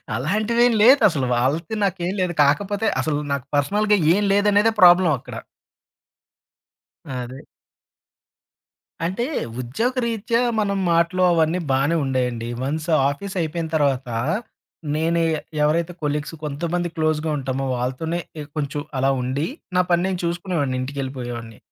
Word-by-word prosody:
అలాంటివి 215 - 0
ఏమి 230 -3 +3
లేదసలు. 205 - +5
వాళ్ళకి 155 - 0
నాకు 190 -2 -2
ఏమి 190 - -2
లేదు. 180 -1 0
కాకపోతే, 200 +9 +1 0.2
అసలు 150 -2 -1
నాకు 140 -3 -3
పర్సనల్‌గా 205 +8 +2 0.2
ఏం 205 - +1
లేదనేదే 205 +2 +3
ప్రాబ్లమ్ 175 -2 +7
అక్కడ. 135 - -10 1.8
అదే. 125 +1 -6 1.6
అంటే, 190 +7 -1 0.4
ఉద్యోగరీత్యా 230 - -1 0.2
మనం 200 -1 0
మాటలు 170 +2 +2
అవన్నీ 165 +1 +2
బానే 140 +5 +2
ఉండేయండి. 125 -3 -1
వన్స్ 155 +5 -3 0.2
ఆఫీస్ 195 +7 -6
అయిపోయిన 165 0 -3
తర్వాత, 135 -4 +1 0.9
నేనే 165 +1 +1 0.4
ఎవరైతే 160 +3 +1
కొలీగ్స్ 150 +1 -2
కొంతమంది 170 +4 -2
క్లోజ్‌గా 155 0 0
ఉంటామో, 135 0 -3
వాళ్ళతోనే 135 +7 -2 0.2
ఎ - - -4
కొంచెం 145 0 -2 0.2
అలా 135 +1 +2
ఉండి, 135 +5 -1 0.3
నా 180 - +5
పని 175 0 +3
నేను 185 -2 -2
చూసుకునేవాడిని 170 -6 -1
ఇంటికెళ్ళిపోయేవాడిని. 125 -4 -5
160 Hz, 120 wpm, -22 LUFS, 135-190 Hz, 1.8 s, ప్రాబ్లమ్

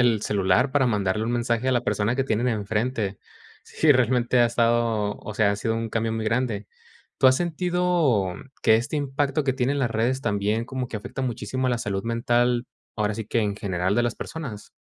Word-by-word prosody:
el 115 -4 +3
celular 100 +5 +2
para 135 -1 +2
mandarle 105 -2 0
un 115 - -1
mensaje 120 0 0
a 130 - +3
la 120 -1 +1
persona 105 +1 0
que 135 - +1
tienen 120 -2 0
enfrente. 110 -2 -1 0.5
Sí, 155 - +1
realmente 125 -1 +3
ha 120 - +6
estado 115 -3 +1
o 110 - -8
sea, 105 -1 +3
ha 100 - -1
sido 110 +1 -1
un 115 0 -2
cambio 115 0 -1
muy 110 -1 -2
grande. 115 -3 -1 0.5
¿Tú - - +5
has 130 0 +6
sentido, 175 - +1
mm, - - -10 0.2
que 110 - +6
este 120 +7 -3
impacto 140 0 0
que 135 -2 +1
tienen 130 +3 0
las 120 -3 0
redes, 120 +4 0
también, 105 0 0
como 130 -1 -3
que 115 - -5
afecta 105 +5 -6
muchísimo 130 0 -2
a - - +2
la 120 - 0
salud 100 -3 -3
mental, 120 +1 +1 0.3
ahora 105 -1 0
sí 110 +1 -5
que 115 - 0
en 105 -2 -1
general 95 0 -1
de 120 - +3
las 120 - -1
personas? 130 -11 -7
115 Hz, 210 wpm, -24 LUFS, 105-130 Hz, 0.5 s, ha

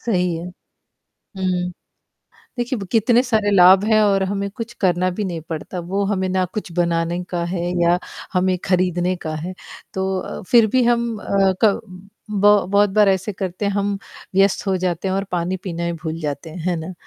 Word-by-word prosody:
सही 180 -6 0
है। 165 - -6 0.9
हुँ। 180 -1 -1 0.9
देखिए 245 +2 -1
ब 195 - -5
कितने 235 +2 +4
सारे 220 -5 +1
लाभ 190 0 +7
हैं 215 -1 +4
और 195 -2 +3
हमें 200 +1 -2
कुछ 230 0 -6
करना 185 -1 +2
भी 185 +4 -3
नहीं 170 -3 -4
पड़ता, 165 +3 -5
वो 190 +4 -2
हमें 190 -2 0
ना 185 0 +1
कुछ 205 -5 -5
बनाने 170 0 0
का 175 -1 -2
है 180 -2 -2 0.2
या 170 +1 +4 0.4
हमें 185 0 +2
खरीदने 180 0 +1
का 155 - -4
है। 170 +4 -5 0.4
तो 190 0 -1
अ, - - -6
फिर 230 -3 +6
भी 255 +4 +2
हम 235 -2 +1
अ, 195 -2 +2
क 210 -1 +4 0.5
ब 205 0 +4
बहुत 205 0 +4
बार 205 0 +4
ऐसे 190 +2 0
करते 190 +1 -4
हैं, 200 - +1
हम 200 0 -1 0.4
व्यस्त 195 +1 +3
हो 190 - +2
जाते 180 0 -2
हैं 190 - 0
और 195 - 0
पानी 180 +1 -1
पीना 170 -3 -4
ही 170 - -1
भूल 160 0 -5
जाते 150 +1 -4
हैं। 160 - -9
हैं 180 -1 +1
ना? 160 +3 -6
190 Hz, 195 wpm, -21 LUFS, 175-205 Hz, 0.9 s, लाभ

